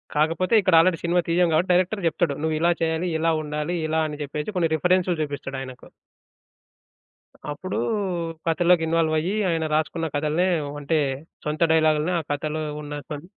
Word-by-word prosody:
కాకపోతే 165 Hz, +7 st, +1 dB
ఇక్కడ 185 Hz, -3 st, +3 dB
already 170 Hz, 0 st, +3 dB
cinema 175 Hz, +1 st, +2 dB
తియ్యం 170 Hz, 0 st, +3 dB
కాబట్టి 180 Hz, +3 st, +2 dB
డైరెక్టర్ 185 Hz, +2 st, +1 dB
చెప్తడు. 160 Hz, -1 st, 0 dB
"నువ్వు 160 Hz, 0 st, 0 dB
ఇలా 170 Hz, +1 st, +3 dB
చేయాలి, 160 Hz, +2 st, 0 dB
ఇలా 165 Hz, +1 st, +2 dB
ఉండాలి" 150 Hz, +3 st, -3 dB
ఇలా 160 Hz, +1 st, +1 dB
అని 150 Hz, -, -7 dB
చెప్పేసి 150 Hz, +8 st, -5 dB
కొన్ని 170 Hz, -2 st, +2 dB
రిఫరెన్సులు 180 Hz, +1 st, +1 dB
చూపిస్తాడు 145 Hz, -2 st, -4 dB
ఆయనకు. 130 Hz, -1 st, -10 dB, 1.6 s
అప్పుడు 185 Hz, +6 st, -5 dB, 0.7 s
కథలోకి 170 Hz, +1 st, +3 dB
ఇన్వాల్వయ్యి 160 Hz, +2 st, +1 dB, 0.2 s
ఆయన 165 Hz, -2 st, 0 dB
రాసుకున్న 160 Hz, +1 st, -1 dB
కథలనే 155 Hz, +5 st, +1 dB, 0.3 s
అంటే 160 Hz, +3 st, 0 dB, 0.5 s
సొంత 150 Hz, +2 st, -3 dB
డైలాగ్‌లని 155 Hz, +1 st, +3 dB
ఆ -, -, -2 dB
కథలో 155 Hz, +2 st, -2 dB, 0.2 s
ఉన్న 145 Hz, 0 st, -6 dB
కొన్ 150 Hz, +2 st, -6 dB
160 Hz, 150 wpm, -24 LUFS, 150-175 Hz, 1.6 s, ఇక్కడ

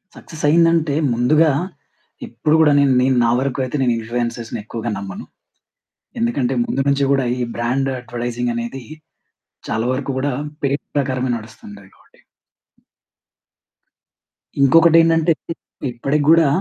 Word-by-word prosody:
Success 160 Hz, -3 st, -11 dB
అయిందంటే, 165 Hz, -2 st, +3 dB, 0.2 s
ముందుగా 150 Hz, +7 st, +3 dB, 0.8 s
ఇప్పుడు 155 Hz, +1 st, 0 dB
గూడా 150 Hz, -2 st, +5 dB
నేన్ 140 Hz, -1 st, +3 dB
నేను 130 Hz, 0 st, +2 dB
నా -, -, +2 dB
వరకు 135 Hz, 0 st, -2 dB
అయితే, 130 Hz, -, -6 dB
నేను 125 Hz, -2 st, +2 dB
ఇన్ఫ్లుయెన్సర్స్‌ని 115 Hz, 0 st, -4 dB
ఎక్కువగా 115 Hz, +2 st, -5 dB
నమ్మను. 95 Hz, -1 st, -7 dB, 0.9 s
ఎందుకంటే, 120 Hz, +2 st, 0 dB
ముందు 135 Hz, -, -2 dB
నుంచి 140 Hz, 0 st, +1 dB
గూడా, 135 Hz, -2 st, +2 dB
ఈ -, -, -2 dB
బ్రాండ్ 130 Hz, +4 st, -1 dB
అడ్వర్టైజింగ్ 120 Hz, 0 st, -4 dB
అనేది, 120 Hz, +3 st, -5 dB, 0.9 s
చాలా 110 Hz, +1 st, -1 dB
వరకు 135 Hz, +1 st, -3 dB
గూడా 140 Hz, +1 st, -1 dB, 0.3 s
పేరు 140 Hz, +1 st, 0 dB, 0.2 s
ప్రకారమే 130 Hz, -2 st, -1 dB
నడుస్తుం‌టయి 100 Hz, -3 st, -13 dB
కాబట్టి. -, -, -27 dB, 2.4 s
ఇంకొకటేంటంటే, 165 Hz, +3 st, +5 dB, 0.2 s
ఇ -, -, -1 dB, 0.4 s
ఇప్పటి‌కి 140 Hz, +5 st, -1 dB
గూడా 165 Hz, -2 st, +6 dB
130 Hz, 120 wpm, -19 LUFS, 120-150 Hz, 2.4 s, గూడా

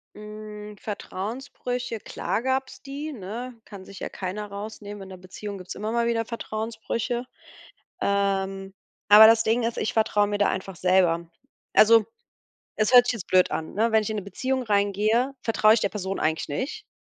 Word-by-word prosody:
Hm, 210 Hz, 0 st, -9 dB
Vertrauensbrüche, 235 Hz, +3 st, -5 dB
klar 225 Hz, -, -3 dB
gab's 260 Hz, 0 st, -2 dB
die, 290 Hz, +3 st, -5 dB
ne? 230 Hz, +3 st, -7 dB
Kann 200 Hz, -3 st, -10 dB
sich 195 Hz, -, -11 dB
ja -, -, -4 dB
keiner 200 Hz, +3 st, -5 dB
rausnehmen. 205 Hz, 0 st, -8 dB
In 190 Hz, -, -11 dB
'ner 185 Hz, -, -9 dB
Beziehung 195 Hz, +2 st, -8 dB
gibt's 185 Hz, 0 st, -8 dB
immer 215 Hz, +2 st, -3 dB
mal 235 Hz, 0 st, +1 dB
wieder 230 Hz, -1 st, +1 dB
Vertrauensbrüche. 230 Hz, +2 st, -3 dB, 0.8 s
Ähm, 195 Hz, -1 st, 0 dB, 0.4 s
aber 210 Hz, +1 st, +10 dB
das 225 Hz, 0 st, +6 dB
Ding 225 Hz, +2 st, +1 dB
ist, 230 Hz, 0 st, -1 dB
ich -, -, -1 dB
vertraue 210 Hz, -2 st, +2 dB
mir 205 Hz, 0 st, -1 dB
da 205 Hz, -, +3 dB
einfach 190 Hz, -1 st, -4 dB
selber. 175 Hz, -2 st, +2 dB, 0.5 s
Also, 225 Hz, 0 st, +7 dB, 0.7 s
es 215 Hz, +3 st, +1 dB
hört 245 Hz, 0 st, +8 dB
sich 245 Hz, -, +1 dB
jetzt 215 Hz, -6 st, -7 dB
blöd 185 Hz, -1 st, +4 dB
an, 160 Hz, -, -4 dB
ne? 225 Hz, +3 st, +1 dB
Wenn 220 Hz, -1 st, +4 dB
ich 215 Hz, -, -4 dB
in 215 Hz, -, -2 dB
'ne 205 Hz, -, -3 dB
Beziehung 260 Hz, +6 st, -2 dB
reingehe, 215 Hz, +5 st, +1 dB
vertraue 215 Hz, -1 st, +4 dB
ich 225 Hz, -, +3 dB
der 200 Hz, -, +1 dB
Person 195 Hz, -1 st, -4 dB
eigentlich 160 Hz, 0 st, 0 dB
nicht, 310 Hz, -, -4 dB
215 Hz, 175 wpm, -25 LUFS, 195-230 Hz, 0.8 s, aber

